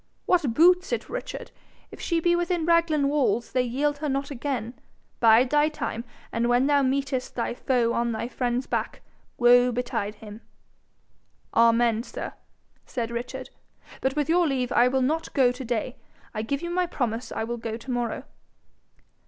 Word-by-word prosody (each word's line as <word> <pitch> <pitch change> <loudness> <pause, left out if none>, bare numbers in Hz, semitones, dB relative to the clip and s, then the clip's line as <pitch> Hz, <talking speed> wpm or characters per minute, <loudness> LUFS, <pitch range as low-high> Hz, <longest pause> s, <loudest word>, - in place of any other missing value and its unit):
'What 300 -11 +2
boots 360 +3 +5
it, - - -2
Richard? - - -6 0.4
If - - -11
she 335 -2 0
be 345 +1 +3
within 345 -1 0
Raglan 335 -4 +3
walls, 280 -5 +1
they 255 - +2
yield 285 +4 -1
her 300 0 -2
not 275 +1 -2
again. 245 -3 -3 0.5
Bide 235 +2 +5
thy 295 +1 +4
time; 235 -6 -4 0.3
and 235 +1 0
when 245 +2 +3
thou 285 0 +4
meetest 265 -1 -1
thy 235 - -1
foe 240 -2 +1
on 235 0 0
thy 225 +1 -3
friend's 250 0 -1
back, - - -3 0.4
woe 245 0 +6
betide 235 -4 -2
him!' 210 +1 -11 1.1
'Amen, 230 -1 +4
sir!' 240 - -7 0.5
said 235 -2 -4
Richard. 250 +2 -5 0.5
'But 265 0 0
with 295 -1 0
your 340 +1 +3
leave 255 -3 -1
I 240 - +5
will 260 +1 +1
not 315 +5 -1
go 260 -4 +5
to 250 +2 -7
day. 240 0 -3 0.4
I 215 - -2
give 280 +8 -3
you 345 - -3
my 360 0 +1
promise 240 -7 -3
I - - -2
will 240 +1 -3
go 225 -1 -4
to 245 +3 -7
morrow.' 240 -1 -2
255 Hz, 170 wpm, -26 LUFS, 235-295 Hz, 1.1 s, woe